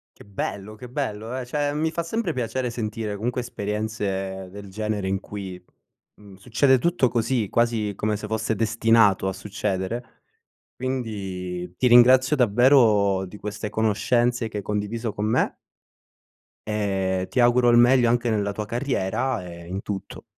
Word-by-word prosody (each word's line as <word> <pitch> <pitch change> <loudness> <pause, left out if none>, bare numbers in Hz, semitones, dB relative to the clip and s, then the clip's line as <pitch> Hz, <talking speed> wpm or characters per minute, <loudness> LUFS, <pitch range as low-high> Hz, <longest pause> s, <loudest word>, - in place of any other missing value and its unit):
Che - - -15
bello, 100 +1 -5
che 120 +3 -10
bello! 120 -2 -3
Eh, 125 - -4
cioè, 145 +2 -1
mi 160 +2 0
fa 170 - -2
sempre 175 0 -2
piacere 125 0 -2
sentire 110 -2 -4
comunque 120 +5 -2
esperienze 100 -4 -3
del 100 +1 -9
genere 105 0 -3
in 95 0 0
cui, 95 -3 -8 0.5
mhmm, 100 -2 -15
succede 125 +5 +3
tutto 170 -2 +2
così, 115 -2 0
quasi 115 -3 +1
come 105 +1 -1
se 105 - -7
fosse 110 +1 -1
destinato 115 -2 +3
a 95 - -1
succedere. 105 +3 -4 0.5
Quindi 95 -8 -4
ti 125 - +2
ringrazio 130 +4 +6
davvero 110 -5 +4
di 100 +3 -11
queste 105 +1 -5
conoscenze 115 +3 +1
che 105 -2 -5
hai - - -4
condiviso 105 +2 -3
con 105 0 -3
me. 110 - +1 1.1
E 95 -3 -1
ti - - -1
auguro 120 0 +5
il 120 - +6
meglio 120 0 +5
anche 120 0 +1
nella 100 -2 0
tua 105 +1 -4
carriera 120 -2 -1
e 85 0 -10
in 95 +3 -5
tutto. 100 -2 -6
110 Hz, 155 wpm, -24 LUFS, 100-120 Hz, 1.1 s, ringrazio